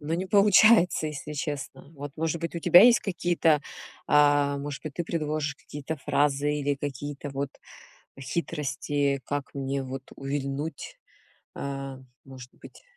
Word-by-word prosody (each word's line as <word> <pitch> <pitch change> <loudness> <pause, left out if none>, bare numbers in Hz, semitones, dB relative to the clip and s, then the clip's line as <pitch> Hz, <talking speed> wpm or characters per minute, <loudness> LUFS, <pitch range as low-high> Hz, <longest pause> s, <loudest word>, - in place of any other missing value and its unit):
но 155 +2 -2
не 185 +2 -2
получается, 200 -3 +5
если 150 0 -6
честно. 145 -2 -5
Вот 145 -1 -7
может 160 +1 -1
быть, 170 - -3
у - - -2
тебя 175 +3 +8
есть 240 0 +7
какие-то, 175 -5 +1 0.5
э, 145 -1 +4
может 145 0 -6
быть, 155 -3 -7
ты 175 - -2
предложишь 155 -2 -2
какие-то 150 +2 -7
фразы 145 0 +1
или 145 -1 0
какие-то 145 +1 -6
вот 140 +1 -3 0.7
хитрости, 145 -1 -2
как 145 -1 -4
мне 135 0 -2
вот 130 0 -6
увильнуть, 140 +2 -4 0.6
э, 135 -1 -5 0.3
может 130 -2 -11
быть? - - -15
145 Hz, 140 wpm, -27 LUFS, 140-160 Hz, 0.7 s, тебя